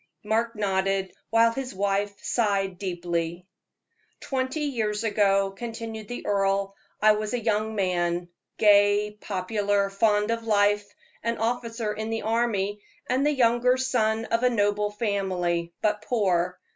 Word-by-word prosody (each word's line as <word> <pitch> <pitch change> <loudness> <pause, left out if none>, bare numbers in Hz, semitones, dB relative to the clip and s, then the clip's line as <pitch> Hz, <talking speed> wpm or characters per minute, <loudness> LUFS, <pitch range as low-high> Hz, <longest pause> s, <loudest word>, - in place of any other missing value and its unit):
Mark 225 +2 0
nodded, 195 -2 0 0.2
while 230 +1 +4
his 255 -3 -5
wife 200 +1 0
sighed 195 -5 0
deeply. 175 -2 -3 0.7
"Twenty 260 +3 -2
years 225 -7 -1
ago," 195 -2 +2
continued 225 0 -7
the 245 - -6
earl, 195 0 0 0.2
"I 215 0 +6
was 215 +2 -1
a - - -1
young 220 -1 0
man, 175 -3 0 0.3
gay, 205 0 +4
popular, 205 0 -1
fond 210 +1 +2
of 230 0 -2
life, 205 -1 +2 0.3
an 230 +1 -1
officer 230 -1 -2
in 220 +1 -4
the 225 0 -2
army, 210 -3 0 0.3
and 260 +2 +1
the 295 - +3
younger 250 -1 +3
son 225 -4 0
of 230 +1 0
a 250 - +4
noble 205 -2 +1
family, 190 -5 -1
but 210 -1 +1
poor. 185 -6 0
210 Hz, 135 wpm, -26 LUFS, 195-230 Hz, 0.7 s, I